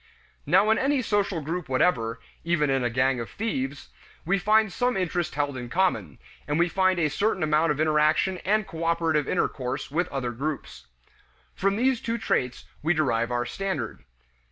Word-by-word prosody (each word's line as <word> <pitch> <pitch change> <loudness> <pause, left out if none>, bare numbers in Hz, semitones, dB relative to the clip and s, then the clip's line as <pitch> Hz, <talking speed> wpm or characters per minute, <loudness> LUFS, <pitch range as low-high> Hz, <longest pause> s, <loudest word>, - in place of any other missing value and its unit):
Now 195 +4 +5
in 220 - +3
any 270 -1 +1
social 200 -6 0
group 165 +1 -4
whatever, 125 -4 +1 0.2
even 165 -4 +1
in 135 -1 +1
a 120 - +1
gang 130 +2 +1
of 115 - -5
thieves, 140 -11 -3 0.4
we 195 +4 +2
find 215 0 +3
some 245 +2 0
interest 175 -2 -1
held 145 -1 -1
in 120 -2 -6
common, 190 +6 0 0.3
and 145 0 0
we 170 +1 +3
find 185 0 +2
a 165 -3 +2
certain 190 +4 0
amount 155 +1 +3
of 150 - -2
interaction 155 +4 +2
and 215 +2 +1
cooperative 165 -3 0
intercourse 130 -8 -2
with 175 +4 0
other 130 -3 -3
groups. 140 +5 -5 0.7
From 195 +1 0
these 250 +2 +1
two 230 0 -2
traits 125 - -1 0.2
we 160 +3 +2
derive 120 -7 +1
our 120 0 -1
standard. 120 - -4
160 Hz, 170 wpm, -26 LUFS, 135-190 Hz, 0.7 s, Now